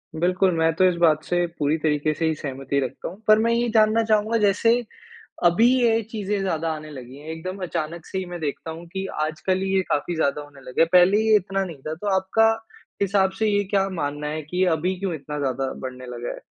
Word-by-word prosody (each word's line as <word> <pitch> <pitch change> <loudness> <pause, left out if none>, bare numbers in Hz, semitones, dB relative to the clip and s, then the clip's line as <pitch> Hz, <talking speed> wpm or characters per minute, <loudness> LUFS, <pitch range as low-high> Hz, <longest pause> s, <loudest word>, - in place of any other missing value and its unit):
बिल्कुल, 180 +3 +2
मैं 160 0 +3
तो 185 +1 +4
इस 175 - -1
बात 155 -2 +3
से 175 0 0
पूरी 150 +2 +1
तरीके 155 -1 0
से 165 +2 -2
ही 160 - +2
सहमति 135 -1 -3
रखता 130 -2 -4
हूँ। 195 +6 -10
पर 215 0 +7
मैं 230 +1 +2
ये 240 +1 +1
जानना 220 +1 +4
चाहूँगा 220 +1 +2
जैसे 210 +2 +3 0.7
अभी 215 +8 +5
ये 230 -1 +3
चीज़ें 205 -2 -2
ज़्यादा 165 -4 -1
आने 155 0 -8
लगी 130 -1 -10
हैं। 150 +2 -12
एकदम 185 +4 -6
अचानक 165 -1 -4
से 190 - -5
ही 190 - -2
मैं 175 -1 -7
देखता 155 +1 -4
हूँ 165 +2 -9
कि 190 0 -3 0.2
आजकल 185 +5 -1
ये 190 0 +1
काफ़ी 165 +4 0
ज़्यादा 150 -2 0
होने 145 -2 -14
लगे 130 +4 -2
हैं। 165 - +5
पहले 180 +3 +6
ये 220 -1 +4
इतना 195 0 -2
नहीं 165 -6 -7
था। 155 - -2
तो 205 - -3
आपका 225 +4 +3 0.5
हिसाब 195 -1 +2
से 220 - +2
ये 205 -1 +2
क्या 195 -1 +2
मानना 145 -4 -3
है 155 +1 -3
कि 180 +5 -1
अभी 180 +4 -1
क्यों 195 -3 -2
इतना 150 +1 -6
ज़्यादा 135 -1 -1
बढ़ने 130 -1 -7
लगा 120 -1 -5
है। - - -10
175 Hz, 225 wpm, -23 LUFS, 150-195 Hz, 0.7 s, पर